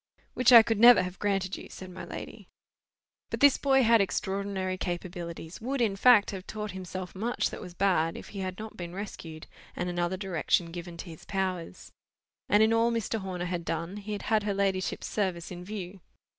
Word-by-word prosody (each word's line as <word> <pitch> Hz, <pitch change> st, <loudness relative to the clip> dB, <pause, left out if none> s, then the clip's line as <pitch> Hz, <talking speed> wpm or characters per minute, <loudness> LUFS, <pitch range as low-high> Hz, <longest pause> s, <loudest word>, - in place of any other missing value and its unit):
"Which 255 Hz, 0 st, +4 dB
I 230 Hz, -2 st, +11 dB
could 225 Hz, -2 st, -1 dB
never 240 Hz, -4 st, +8 dB
have 180 Hz, 0 st, -6 dB
granted 195 Hz, -2 st, -1 dB
you," -, -, -10 dB
said 185 Hz, -1 st, -9 dB
my 180 Hz, -, -8 dB
lady. -, -, -8 dB, 0.8 s
But -, -, -3 dB
this 285 Hz, -1 st, +6 dB
boy 270 Hz, -1 st, +4 dB
had 230 Hz, -1 st, +5 dB
extraordinary 195 Hz, -1 st, -2 dB
capabilities; 175 Hz, -1 st, -5 dB
would, 265 Hz, +4 st, -2 dB
in 220 Hz, -5 st, +1 dB
fact, 220 Hz, 0 st, +6 dB
have 190 Hz, -2 st, -7 dB
taught 210 Hz, -1 st, -5 dB
himself 185 Hz, 0 st, -6 dB
much 225 Hz, +5 st, -1 dB
that -, -, -7 dB
was 180 Hz, -1 st, -9 dB
bad, 170 Hz, -4 st, +1 dB
if -, -, -10 dB
he 200 Hz, -, -7 dB
had 185 Hz, -1 st, -4 dB
not 220 Hz, 0 st, -8 dB
been 175 Hz, 0 st, -7 dB
rescued, 165 Hz, -6 st, -7 dB, 0.3 s
and 180 Hz, 0 st, -2 dB
another 175 Hz, +1 st, -1 dB
direction 175 Hz, -2 st, 0 dB
given 170 Hz, 0 st, -7 dB
to -, -, -7 dB
his 160 Hz, -, -12 dB
powers. 185 Hz, -, -3 dB, 0.6 s
And 205 Hz, +2 st, +5 dB
in 220 Hz, +1 st, +4 dB
all 230 Hz, +1 st, +3 dB
Mr. 225 Hz, -1 st, -1 dB
Horner 185 Hz, -2 st, -4 dB
had 175 Hz, -1 st, -3 dB
done, 165 Hz, +4 st, -3 dB
he 210 Hz, +1 st, -5 dB
had 205 Hz, -, -5 dB
had 220 Hz, -1 st, +2 dB
her 205 Hz, -1 st, -2 dB
ladyship's 190 Hz, -2 st, -1 dB
service 185 Hz, -5 st, -2 dB
in 180 Hz, 0 st, -7 dB
view. 195 Hz, -1 st, -7 dB
190 Hz, 200 wpm, -29 LUFS, 180-210 Hz, 0.8 s, I